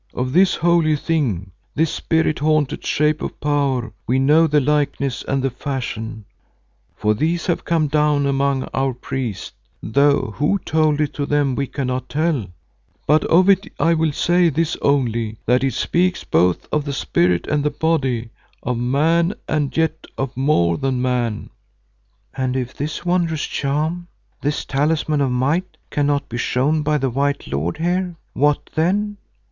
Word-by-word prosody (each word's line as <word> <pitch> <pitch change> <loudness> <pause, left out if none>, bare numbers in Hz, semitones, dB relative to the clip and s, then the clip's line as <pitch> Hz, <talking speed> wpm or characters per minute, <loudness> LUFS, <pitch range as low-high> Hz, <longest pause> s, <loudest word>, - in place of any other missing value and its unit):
Of 130 +1 -2
this 185 +3 +4
holy 170 -2 +3
thing, 130 - -1 0.2
this 160 +1 +1
spirit 160 -1 0
haunted 150 -2 +1
shape 150 +1 +1
of - - -5
power, 140 -6 0
we 125 - +2
know 150 +5 +4
the 150 -1 +3
likeness 140 -2 0
and 135 -1 0
the 135 - 0
fashion, 120 -4 -5 0.7
for 105 0 +1
these 165 +9 -1
have 175 - -1
come 165 -2 +2
down 150 -1 +2
among 140 -1 +1
our 135 -2 0
priests, 125 -4 -4 0.3
though 140 -1 +2
who 150 +8 +2
told 155 -2 +2
it 150 - -1
to 145 -1 -3
them 145 -2 +1
we 140 +2 -2
cannot 130 -2 -3
tell, 150 - 0 0.6
but 155 +2 +3
of 180 +3 +4
it 195 0 +3
I 170 - +3
will 160 -1 +1
say 175 +3 +3
this 165 +2 0
only, 115 -6 0
that 125 +3 +2
it 135 -3 0
speaks 180 +5 0
both 90 -1 +1
of 150 - +1
the 140 -1 -4
spirit 90 -9 +1
and 150 -1 0
the 150 - +2
body, 135 -7 -1 0.3
of 120 -1 -1
man 160 +9 +2
and 150 -2 -1
yet 160 0 0
of 135 -1 -3
more 85 - +2
than 130 -2 -1
man." 125 -4 -1 0.8
"And 130 -1 -1
if 130 0 -3
this 150 +4 -4
wondrous 170 -3 0
charm, 155 +5 -2 0.3
this 145 +1 -1
talisman 150 +1 0
of 135 - +2
might, 145 +9 -1
cannot 145 -1 0
be 120 - -5
shown 145 +6 +1
by 150 0 +1
the 135 -2 -1
white 140 +3 -1
lord 75 +5 -2
here, 175 +2 -1 0.2
what 145 +1 +1
then?" 205 +6 0
145 Hz, 160 wpm, -20 LUFS, 130-160 Hz, 0.8 s, this